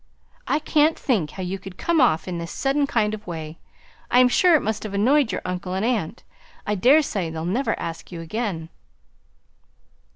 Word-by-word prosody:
"I - - +2
can't 310 +1 +2
think 210 - 0
how 185 - -7
you 190 +2 -4
could 185 -1 -11
come 335 -3 +1
off 170 -11 +2
in 175 -2 -3
this 170 0 -6
sudden 280 +1 0
kind 215 -5 +1
of 215 -1 -8
way; 160 -2 -6 0.5
I - - +3
am 250 0 +6
sure 350 +6 +5
it 305 - +3
must 220 0 -2
have 205 -2 -5
annoyed 255 +5 +3
your - - -4
uncle 180 0 -4
and 195 +3 -1
aunt. 225 -10 -2 0.4
I 210 - 0
daresay 225 - +3
they'll 160 0 -5
never 235 +10 -1
ask 165 +2 -6
you 170 - -6
again." 165 -2 -4
205 Hz, 190 wpm, -23 LUFS, 175-255 Hz, 0.5 s, am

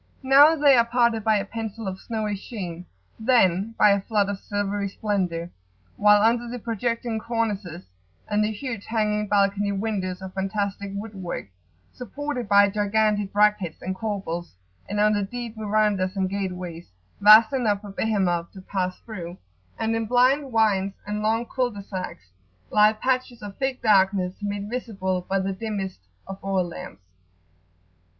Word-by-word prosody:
Now 280 +4 +7
they 285 -3 +5
are 235 - +5
parted 235 -2 +2
by 220 0 +3
a 200 -1 0
pencil 225 0 -6
of 190 0 -4
snowy 215 -3 -2
sheen, 180 -5 -7 0.3
then 220 -3 +2
by 210 - +6
a 200 0 +2
flood 205 -1 0
of 200 -1 -3
silvery 205 0 -2
splendour; 180 -5 -2 0.4
while 210 0 +5
under 235 +2 +2
the 245 - -5
projecting 230 0 -2
cornices 210 -7 -3 0.4
and 210 0 +1
the 210 - 0
huge 225 -1 -6
hanging 210 -2 0
balcony 200 0 +2
windows 195 -3 -2
of 190 0 -7
fantastic 200 0 -3
wood 210 +2 -6
work, 180 - -6 0.4
supported 250 -2 -5
by 200 0 +6
gigantic 205 0 +1
brackets 205 -5 +2
and 190 - -2
corbels, 190 - -4 0.3
and 205 +1 -2
under 210 0 +3
deep 235 +2 -6
verandahs, 210 -3 0
and 190 -1 0
gateways, 180 -4 -5 0.3
vast 215 +4 +8
enough 215 -6 +1
for 205 -2 -9
Behemoth 190 -5 0
to 190 - -10
pass 185 -1 -2
through, 180 -6 -8 0.4
and 225 0 0
in 225 -1 -2
blind 260 +4 +3
wynds 200 -4 +2
and 210 +1 -3
long 225 +2 +1
cul 250 0 -1
de 205 -3 -9
sacs, 185 - -7 0.4
lie 210 0 +6
patches 255 +1 -2
of 200 -1 -7
thick 265 -1 -2
darkness, 195 -3 +3
made 205 0 -3
visible 200 -6 -3
by 195 - +1
the 195 0 -1
dimmest 195 -2 -4 0.3
of 195 0 -9
oil 195 -2 0
lamps. 95 - -9
205 Hz, 155 wpm, -24 LUFS, 195-225 Hz, 0.4 s, vast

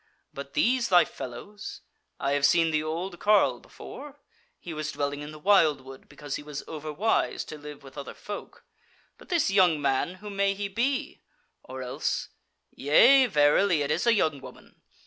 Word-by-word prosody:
But - - -8
these 255 -4 +2
thy 180 -2 +6
fellows? 135 - -9 0.4
I 140 - -1
have 145 0 0
seen 165 +3 +4
the 155 -1 +1
old 170 +4 -4
carle 210 0 +3
before: 290 -1 -11 0.4
he 170 - -8
was 155 0 -4
dwelling 145 0 -3
in 150 +1 -7
the 155 - -10
wildwood 150 -7 +1
because 145 -2 -6
he - - -8
was 150 -1 -7
overwise 155 +7 -1
to 155 - -8
live 145 -1 -10
with 135 +1 -10
other 140 - -8
folk. 205 -1 -9 0.5
But - - -17
this 340 - +1
young 180 -6 +4
man, 140 +5 0
who 210 +2 -9
may 200 0 +1
he 200 0 -3
be? 255 +7 -2 0.4
Or 130 0 -8
else 125 - -3 0.4
yea, 250 - +5
verily, 150 -1 +3
it 140 - -2
is - - 0
a 235 - +5
young 155 -8 0
woman. - - -14
160 Hz, 170 wpm, -27 LUFS, 145-205 Hz, 0.5 s, thy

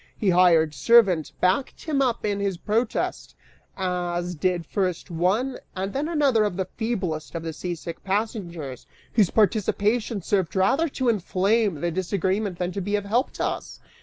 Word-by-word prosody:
His 195 -4 +2
hired 165 -4 +5
servant 190 - +4
backed 185 +9 +1
him 295 -4 0
up 245 -5 0
in 205 -1 0
his 200 -3 -1
protest, 220 +5 -1 0.4
as 180 -1 -2
did 175 +1 -1
first 185 0 -2
one 195 +11 0 0.2
and 195 +1 -3
then 285 +3 -1
another 285 -9 +3
of 205 -4 -1
the 190 - 0
feeblest 185 -8 -3
of 165 - -3
the 165 -1 -4
seasick 170 0 -6
passengers, 190 - -3 0.3
whose 210 -6 +4
participation 215 0 +1
served 190 -3 0
rather 265 - +2
to 260 -2 -2
inflame 200 -3 +1
the 175 - 0
disagreement 190 +2 -1
than 180 0 -2
to 195 - -4
be 205 +3 -1
of 205 -1 -2
help 235 +7 +1
to - - -2
us. - - -4
195 Hz, 165 wpm, -25 LUFS, 175-220 Hz, 0.4 s, hired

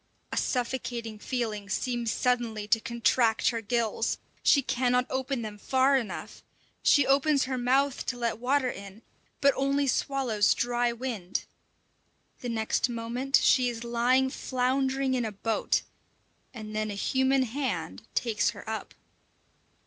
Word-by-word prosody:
A - - -3
suffocating 240 -3 -2
feeling 215 -5 -3
seems 240 +2 -1
suddenly 235 -4 0
to 230 0 +4
contract 235 0 +2
her 230 -1 -2
gills; 225 0 0 0.2
she 280 - +4
cannot 250 0 +1
open 260 -2 -2
them 210 -1 -7
far 265 +5 +3
enough. 240 -5 -4 0.4
She 285 -2 +5
opens 280 +1 +3
her 260 0 -2
mouth 260 +2 +1
to 245 - -2
let 235 -2 -2
water 255 +1 +1
in, 200 +2 -11 0.4
but 280 -1 +5
only 275 +1 +1
swallows 255 -6 +1
dry 240 0 +1
wind. 235 -7 -4 0.9
The 245 - -5
next 225 +2 0
moment 240 +4 -1
she 250 -2 +4
is 235 -1 -6
lying 245 +3 +2
floundering 265 +1 0
in 250 -2 0
a 220 - -2
boat, 215 +2 0 0.7
and 215 -3 -8
then 215 0 -1
a 205 - -4
human 265 +5 +2
hand 230 - -3
takes 220 -4 +1
her - - -11
up. 220 0 -5
245 Hz, 140 wpm, -28 LUFS, 225-260 Hz, 0.9 s, She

